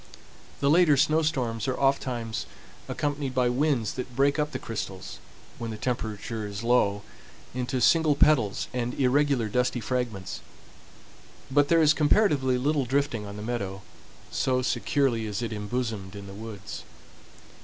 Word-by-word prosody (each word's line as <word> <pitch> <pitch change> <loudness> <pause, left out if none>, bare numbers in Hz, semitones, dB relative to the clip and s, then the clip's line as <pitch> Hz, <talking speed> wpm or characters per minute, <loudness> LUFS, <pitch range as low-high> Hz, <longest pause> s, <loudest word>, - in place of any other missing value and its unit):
The 140 - +3
later 160 -3 +5
snow 155 +3 +3
storms 120 -7 -1
are 130 - -1
oftentimes 125 -4 0 0.4
accompanied 145 -3 -2
by 125 -1 +3
winds 130 -3 +1
that 125 -1 -6
break 140 +3 +3
up 150 0 +1
the 130 - -3
crystals, 100 -6 -6 0.4
when 115 - -4
the 110 - -5
temperature 110 -2 -3
is 100 +1 -6
low, 105 -4 +2 0.5
into 125 +1 -2
single 155 +4 +4
petals 140 -9 +3
and 125 0 -2
irregular 140 -2 +2
dusty 125 +3 0
fragments; 120 -6 -3 1.1
but 145 +1 +4
there 165 0 +4
is 150 0 +6
comparatively 145 -5 +3
little 140 +1 +1
drifting 125 -5 -1
on 100 - -7
the 105 - -6
meadow, 100 -4 -3 0.5
so 130 -1 +1
securely 125 -4 +1
is 105 +3 -3
it 115 -1 -3
embosomed 105 -2 -3
in 100 0 -8
the 95 - -9
woods. 105 -1 -7
125 Hz, 145 wpm, -27 LUFS, 110-140 Hz, 1.1 s, is